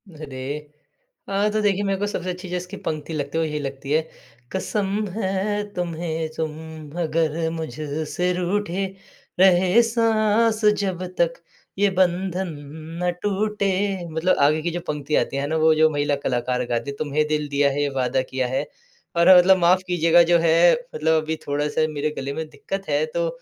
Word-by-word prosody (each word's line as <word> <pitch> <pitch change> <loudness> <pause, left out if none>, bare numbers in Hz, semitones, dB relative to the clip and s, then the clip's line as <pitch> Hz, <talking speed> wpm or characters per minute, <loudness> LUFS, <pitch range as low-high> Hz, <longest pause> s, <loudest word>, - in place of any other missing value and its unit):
अरे! 140 -4 -8 0.9
अ, 200 +2 +1
तो 215 - +1
देखिए, 205 -1 +1
मैं 195 -1 0
को 205 - 0
सबसे 185 -3 -3
अच्छी 180 0 -6
जो 180 - -1
इसकी 180 +3 -7
पंक्ति 155 +1 -3
लगती 145 +1 -3
है, - - +2
वो - - 0
यही 150 0 -3
लगती 135 0 -6
है, 155 +1 +4 0.5
कसम 200 +2 -1
है 205 0 -1
तुम्हें, 165 -2 -3
तुम 155 -1 -2 0.5
अगर 160 0 0
मुझ 160 -3 -4 0.4
से 180 0 0
रूठे। 185 +1 -1 0.5
रहे 185 +3 +5
साँस 225 -1 +2 0.2
जब 185 -2 -2 0.2
तक, 170 -1 +3 0.5
ये 205 - +4
बंधन 185 0 +1 0.5
ना 180 0 +1
टूटे। 205 0 0 0.4
मतलब 160 +4 +1
आगे 155 +2 +4
की 170 +2 -2
जो 175 - -3
पंक्ति 150 0 -2
आती 135 - 0
है 140 - -1
ना, 160 - -1
वो 160 0 +5
जो 155 0 +5
महिला 145 -1 0
कलाकार 125 0 0
गाती 120 +3 -2
है, - - -9
"तुम्हें 150 0 0
दिल 150 -1 -1
दिया 140 0 +3
है, 145 +1 -1
ये 145 - +1
वादा 130 +1 +1
किया 130 -1 0
है।" 130 +4 -1 0.5
और 180 +2 +7
मतलब 190 +1 +6
माफ़ 180 +1 +4
कीजिएगा, 170 -1 +5
जो 170 0 +4
है, 170 +1 +5 0.2
मतलब 160 +1 +2
अभी 160 +1 -2
थोड़ा-सा 145 +2 0
मेरे 150 +1 -1
गले 135 +1 -3
में 160 +2 -4
दिक्कत 195 +7 -6
है, 475 - +2
तो - - -2
170 Hz, 180 wpm, -23 LUFS, 150-190 Hz, 0.9 s, और